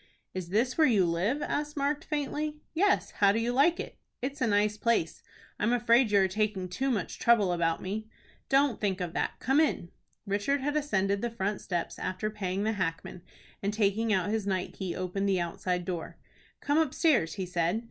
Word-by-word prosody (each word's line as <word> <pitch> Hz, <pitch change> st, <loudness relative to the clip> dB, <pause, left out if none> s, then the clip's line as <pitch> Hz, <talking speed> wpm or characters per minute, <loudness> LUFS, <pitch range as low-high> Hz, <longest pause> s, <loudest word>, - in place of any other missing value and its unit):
"Is 185 Hz, -2 st, -5 dB
this 240 Hz, -, 0 dB
where 310 Hz, -, +6 dB
you 205 Hz, -7 st, +4 dB
live?" 190 Hz, -, 0 dB
asked 295 Hz, 0 st, -3 dB
Mark, 290 Hz, +2 st, 0 dB
faintly. 300 Hz, 0 st, -2 dB, 0.2 s
"Yes. 390 Hz, +6 st, +2 dB
How 200 Hz, -2 st, +4 dB
do 220 Hz, -, 0 dB
you 235 Hz, +1 st, 0 dB
like 295 Hz, +7 st, +4 dB
it?" -, -, -7 dB, 0.2 s
"It's 270 Hz, +2 st, -4 dB
a 255 Hz, -, +3 dB
nice 210 Hz, 0 st, +2 dB
place. 215 Hz, -6 st, 0 dB, 0.4 s
I -, -, -3 dB
am 230 Hz, +3 st, +3 dB
afraid 235 Hz, 0 st, +4 dB
you 200 Hz, -1 st, +4 dB
are 190 Hz, -, +3 dB
taking 200 Hz, -1 st, -1 dB
too 265 Hz, +9 st, -1 dB
much 210 Hz, -9 st, -2 dB
trouble 215 Hz, -6 st, +4 dB
about 165 Hz, -1 st, 0 dB
me." 215 Hz, +3 st, -4 dB, 0.4 s
"Don't 275 Hz, -3 st, +3 dB
think 195 Hz, -3 st, 0 dB
of 175 Hz, -2 st, -3 dB
that. -, -, -1 dB
Come 270 Hz, +4 st, +2 dB
in." 295 Hz, -, +1 dB, 0.3 s
Richard 205 Hz, +8 st, 0 dB
had 290 Hz, +2 st, -1 dB
ascended 200 Hz, -9 st, +1 dB
the 240 Hz, -, -1 dB
front 205 Hz, -3 st, -2 dB
steps, 175 Hz, -2 st, -3 dB
after 185 Hz, +4 st, -2 dB
paying 195 Hz, -2 st, -2 dB
the 220 Hz, -, +1 dB
hackman, 180 Hz, -3 st, -3 dB, 0.4 s
and 200 Hz, -, 0 dB
taking 220 Hz, +1 st, +1 dB
out 200 Hz, 0 st, +1 dB
his 215 Hz, -2 st, -1 dB
night 190 Hz, -2 st, -1 dB
key 190 Hz, -3 st, -4 dB
opened 190 Hz, +2 st, -2 dB
the 190 Hz, -2 st, +2 dB
outside 180 Hz, +1 st, -2 dB
door. 175 Hz, -3 st, -5 dB, 0.4 s
"Come 290 Hz, +2 st, +2 dB
upstairs," 300 Hz, -, +2 dB
he 190 Hz, -2 st, -3 dB
said. 175 Hz, +3 st, 0 dB
210 Hz, 200 wpm, -29 LUFS, 185-260 Hz, 0.4 s, where